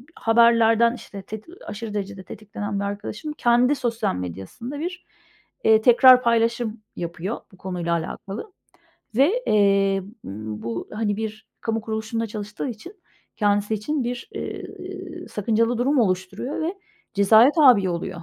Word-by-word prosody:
haberlerden, 230 0 +4
işte, 200 -4 -9
teti 220 - -9 0.2
aşırı 215 0 -6
derecede 200 -2 -4
tetiklenen 205 0 -5
bir 200 - -1
arkadaşım 210 +8 -5
kendi 245 +1 +3
sosyal 230 - -1
medyasında 95 - -6
bir, 355 +2 -5 0.6
eee, 220 0 +5
tekrar 250 +2 +7
paylaşım 230 -1 +1
yapıyor 175 +5 -4
bu 190 - -18
konuyla 180 -2 -3
alakalı 195 - -5 0.7
ve 375 - +3
eee, 195 -2 +3 0.2
bu 110 +3 -5
hani, 210 -1 -1
bir 215 0 -5
kamu 225 0 -1
kuruluşunda 220 +1 -3
çalıştığı 210 +4 -5
için 350 - -10 0.3
kendisi 205 0 +1
için 255 +6 -2
bir, 245 0 -4
eee, - - -7
sakıncalı 230 +3 +1
durum 270 +3 +2
oluşturuyor 195 - -1
ve 345 +5 -2 0.4
cezaya 220 +6 +6
tâbi 250 - +6
oluyor. 170 0 -4
220 Hz, 130 wpm, -23 LUFS, 200-240 Hz, 0.7 s, tekrar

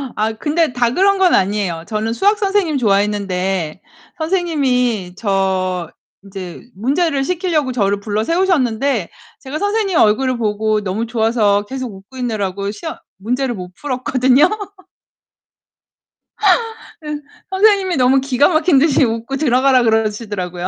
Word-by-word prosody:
아 220 +1 0
근데 300 +4 0
다 240 -1 +1
그런 395 +5 +3
건 370 -2 +3
아니에요. 190 -4 0
저는 220 +1 -2
수학 405 - +2
선생님 390 -7 +1
좋아했는데 195 - 0 0.4
선생님이 270 - 0
저 190 -4 -1 0.3
인제 195 +1 -9
문제를 275 - 0
시키려고 325 -5 -1
저를 205 -4 0
불러 210 +1 -2
세우셨는데 275 - +1 0.3
제가 275 +3 -6
선생님 405 -3 0
얼굴을 255 +4 +3
보고 215 -1 0
너무 205 +3 -2
좋아서 220 -3 +1
계속 260 -1 -6
웃고 195 +7 -14
있느라고 200 -5 -2
시험 320 +9 -6 0.2
문제를 245 +5 -2
못 180 -2 -8
풀었거든요. 260 - +2 2.5
예. 300 -1 -4 0.3
선생님이 385 -3 +3
너무 260 +1 +4
기가 270 +1 +2
막힌 315 -3 +3
듯이 290 0 +4
웃고 230 +3 -2
들어가라 260 -2 +3
그러시더라고요. 210 -5 -1
240 Hz, 310 characters per minute, -17 LUFS, 205-295 Hz, 2.5 s, 너무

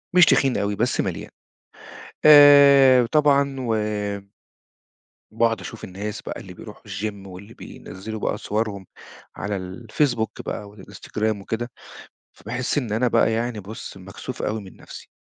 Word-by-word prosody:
مش 180 -2 +8
تخين 135 -6 +3
أوي، 100 0 -1
بس 115 +5 0
مليان، - - -5 0.9
آآ 140 -4 +8
طبعًا 140 0 +2
و 120 -3 -1 1.6
باقعد 115 -1 +1
أشوف 90 - -9
الناس 100 +3 -6
بقى - - -7
اللي - - -11
بيرُوحوا - - -12
الgym، 100 -2 -5
واللي 95 +4 -11
بينزِّلوا 110 +4 -9
بقى - - -2
صورهم 105 -2 -3 0.5
على 100 +1 -3 0.3
الFacebook 120 -7 0
بقى 105 -2 -6
والInstagram 105 +2 -4
وكده، 115 +4 -4 0.6
فباحس 125 +4 -3
إن 120 -7 -3
أنا 120 +3 +1
بقى 115 - +2
يعني، 115 -1 -2
بُص، 105 +1 -9
مكسوف 95 +7 -8
أوي 110 +1 -2
من 95 -2 -13
نفسي. - - -12
110 Hz, 135 wpm, -23 LUFS, 100-130 Hz, 1.6 s, مش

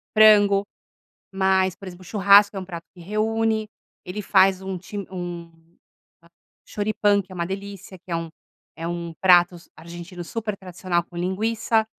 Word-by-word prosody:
Frango. 205 -2 +6 0.7
Mas, 190 -1 +2
por 195 - -11
exemplo, 180 +1 -13
o - - -16
churrasco 200 +1 +5
é - - -2
um 185 - -7
prato 170 -2 -8
que 175 - -13
reúne. 220 +3 0 0.4
Ele 185 +4 -5
faz 190 -1 +4
um 190 -1 -5
chi 205 +3 -8
um, 175 -2 -6 0.7
a 170 - -23 0.4
choripan, 205 -1 +1
que 185 0 -19
é - - -9
uma 170 -1 -2
delícia, 195 -1 -8
que 185 - -23
é - - +1
um 165 0 -4 0.5
é 165 +1 -5
um 170 -1 -4
pratos 175 -2 +4
argentino 175 +2 -9
super 215 +3 -4
tradicional 180 -2 -2
com 175 0 -13
linguiça. 220 +5 0
190 Hz, 165 wpm, -23 LUFS, 175-205 Hz, 0.7 s, Frango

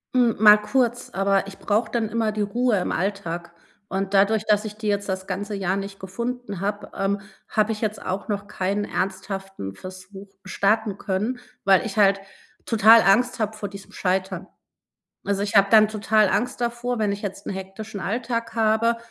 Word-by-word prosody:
Hm, 240 -3 +3
mal 210 -1 +9
kurz, 245 +2 -1
aber 195 0 +1
ich 195 - -11
brauche 215 +3 0
dann 230 -3 -1
immer 225 -1 0
die 215 0 -3
Ruhe 235 +2 +1
im 180 - -2
Alltag. 175 -3 -3 0.4
Und 195 +1 -2
dadurch, 205 +2 +3
dass 210 0 +3
ich 210 -1 -6
die 215 0 -5
jetzt 200 0 -1
das 190 0 -3
ganze 205 +2 -3
Jahr 190 -1 -1
nicht 195 0 -6
gefunden 205 +1 -5
habe, 205 +1 -3
ähm, 195 +1 -1 0.3
habe 215 0 +1
ich 215 - -5
jetzt 215 -1 -2
auch 190 +2 -3
noch 205 -1 -3
keinen 200 +2 -2
ernsthaften 195 - -4
Versuch 185 - -11 0.2
starten 210 0 +1
können, 210 +6 -2 0.2
weil 195 +1 +4
ich 215 -1 -5
halt 195 -1 +5 0.5
total 225 0 +7
Angst 245 +6 +3
habe 215 0 -1
vor 205 -2 -5
diesem 200 0 -11
Scheitern. 190 0 -2 0.8
Also, 200 0 0
ich 205 +1 -2
habe 200 -1 +6
dann 215 -1 +7
total 215 0 +2
Angst 240 +7 -1
davor, 240 0 -2
wenn 210 -2 +1
ich 200 - -7
jetzt 200 -1 -6
'n - - -2
hektischen 190 +2 -7
Alltag 230 +2 -2
habe, 225 +1 +2
205 Hz, 180 wpm, -24 LUFS, 195-220 Hz, 0.8 s, mal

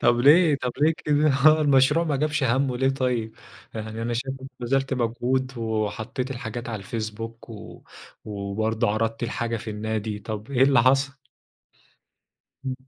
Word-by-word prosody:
طب 120 0 +3
ليه، 155 +4 +6
طب 125 -1 -1
ليه 155 +3 +4
كده؟ 150 +1 +3
هو 155 +3 +5
المشروع 145 +2 +4
ما 150 -4 0
جابش 150 0 0
همّه، 130 +1 +1
ليه 130 +2 +2
طيّب؟ 125 -4 -1 0.4
يعني 110 0 -5
أنا 120 +1 -2
شايف 130 +3 -3
إن - - -11
أنتِ 135 - -9
بذلتِ 135 +2 0
مجهود، 125 +2 -1
وحطِّيتِ 110 +3 -3
الحاجات 120 -2 -5
على 115 - -3
الفيسبوك 115 +1 -6
و 110 -3 -10 0.4
وبرضه 105 +1 -1
عَرَضتِ 115 +2 -1
الحاجة 120 0 -2
في 110 0 -6
النادي، 110 0 -3
طب 105 +3 -7
إيه 130 -2 +2
اللي 135 -3 +5
حصل؟ 135 +2 +3 1.5
إمم. 130 - -1
120 Hz, 160 wpm, -25 LUFS, 110-135 Hz, 1.5 s, ليه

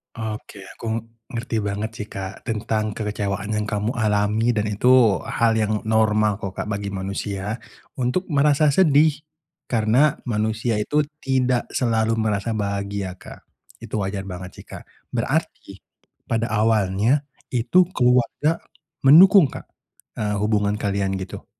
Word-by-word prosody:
Oke 110 -3 -6
aku - - -11 0.4
ngerti 115 0 -4
banget 105 +1 -2
sih 105 - -5
Kak 95 +2 -8
tentang 110 -1 -2
kekecewaan 105 -1 -3
yang 105 0 -1
kamu 105 +2 -1
alami 110 +1 +1
dan 105 - +1
itu 120 0 +4
hal 115 -1 +2
yang 105 -1 0
normal 110 -2 +2
kok 95 -1 -6
Kak - - -4
bagi 100 0 -3
manusia 100 +2 -4 0.4
untuk 125 +9 0
merasa 145 +1 +3
sedih, 155 -1 +5 0.6
karena 120 +6 +3
manusia 110 0 -1
itu 150 +8 +1 0.2
tidak 130 -3 0
selalu 115 -2 +1
merasa 110 0 -1
bahagia 100 -2 -3
Kak - - -12 0.4
itu 115 - -11
wajar 95 0 -3
banget 90 -1 -7
sih - - -41
Kak. - - -11 0.2
Berarti - - -2 0.5
pada 115 0 -1
awalnya 110 +5 +2 0.3
itu 125 +9 +3
keluarga 125 +4 +1 0.4
mendukung 180 +6 +8
Kak, - - -9 0.5
eee, 105 -1 -1
hubungan 105 -1 +1
kalian 100 -2 -1
gitu? 95 -1 -8
110 Hz, 130 wpm, -22 LUFS, 100-120 Hz, 0.6 s, mendukung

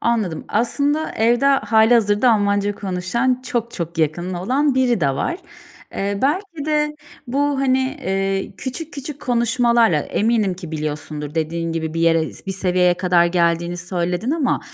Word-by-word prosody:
Anladım. 215 -9 -1
Aslında 285 +7 0
evde 235 +4 +3
h 275 -1 +5
hâlihazırda 220 0 +4
Almanca 205 -1 +1
konuşan 205 +7 -1
çok 240 -2 -2
çok 170 -1 -5
yakının 175 +4 -1
olan 260 +10 +1
biri 245 -5 +2
de 145 - +2
var. 345 - -2 0.6
Eee, 200 0 -2
belki 330 +2 -1
de 300 -1 +1 0.3
bu, 280 +2 0
hani, 260 -1 +3 0.3
eee, 195 0 -1
küçük 295 +5 -6
küçük 285 0 -7
konuşmalarla, 235 - +2
eminim 215 +4 0
ki 175 -3 -9
biliyorsundur 150 -1 -5
dediğin 165 +1 -2
gibi, 160 -1 -3
bir 165 - -1
yere, 165 -1 +3
i - - -7
bir 195 - -2
seviyeye 180 -1 +2
kadar 175 -1 +3
geldiğini 170 0 +1
söyledin 180 +5 -2
ama 310 -4 0
205 Hz, 150 wpm, -20 LUFS, 175-255 Hz, 0.6 s, h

